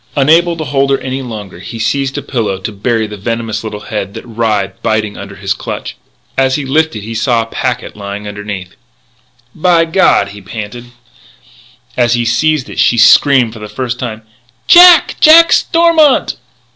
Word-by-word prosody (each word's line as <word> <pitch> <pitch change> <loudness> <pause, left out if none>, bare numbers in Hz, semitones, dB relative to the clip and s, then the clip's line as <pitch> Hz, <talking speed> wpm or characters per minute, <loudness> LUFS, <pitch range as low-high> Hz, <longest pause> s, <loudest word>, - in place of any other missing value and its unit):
Unable 165 +5 +3
to 160 - -4
hold 140 -2 0
her 135 - +2
any 130 0 -5
longer, 105 -8 -8
he 115 +5 -8
seized 135 +4 -2
a 145 - -4
pillow, 115 -8 -2
to 95 +3 -6
bury 110 +2 -1
the 105 -1 -8
venomous 115 0 -4
little 105 -2 -6
head 105 -1 -5
that - - -8
writhed, 110 -4 -2
biting, 105 -1 -1
under 100 0 -9
his 100 0 -2
clutch. - - -7 0.4
As 130 0 +1
he 145 - -3
lifted 145 -5 -1
it - - -9
he 115 - -6
saw 115 +1 0
a - - -9
packet 115 - -4
lying 100 0 -7
under 105 0 -7
it. 95 -3 -5 0.8
"By 170 0 +2
God!" 160 - +2
he 100 0 -11
panted. 110 +4 -8 1.1
As 120 -1 +2
he 120 0 -1
seized 130 +4 0
it - - -8
she 120 - +3
screamed 120 +1 +4
for 110 - -11
the 105 0 -9
first 125 0 -4
time: 110 -3 -6 0.4
"Jack! 350 -2 +7
Jack 330 +2 +7
Stormont!" 330 -4 +3
115 Hz, 180 wpm, -13 LUFS, 105-140 Hz, 1.1 s, Jack